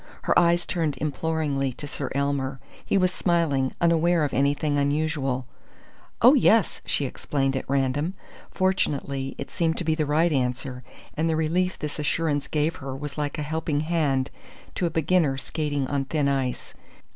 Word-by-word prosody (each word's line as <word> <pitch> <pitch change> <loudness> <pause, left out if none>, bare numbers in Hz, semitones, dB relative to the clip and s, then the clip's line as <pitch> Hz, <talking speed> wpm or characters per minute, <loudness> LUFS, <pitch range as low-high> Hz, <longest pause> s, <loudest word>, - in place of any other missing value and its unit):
Her - - +4
eyes 170 0 +3
turned 155 -6 -1
imploringly 145 -2 -1
to 145 - -7
Sir 140 -1 -4
Elmer. 140 -1 -1 0.2
He - - +1
was 185 -1 +2
smiling, 160 -9 +1
unaware 170 0 +3
of 145 - -1
anything 145 +2 +1
unusual. 140 -3 0 0.8
"Oh, - - +9
yes!" - - +3
she - - +1
exclaimed 135 -2 -1
at 130 - -4
random. 140 +6 0 0.3
Fortunately 140 -8 -1
it 140 - -6
seemed 165 -1 0
to - - -2
be 160 -1 +1
the 155 -2 -1
right 160 +3 +3
answer; 125 -1 -1 0.3
and 160 +2 +1
the 160 - +1
relief 175 +4 0
this 150 0 -5
assurance 150 -1 0
gave 155 +1 -1
was 135 +2 -5
like 145 0 -2
a 150 - -2
helping 155 -1 -1
hand 150 -5 0 0.4
to 175 - 0
a - - -1
beginner 160 -3 +2
skating 145 -1 -2
on 140 0 -1
thin 145 0 0
ice. 135 -3 -2
150 Hz, 160 wpm, -25 LUFS, 135-160 Hz, 0.8 s, Oh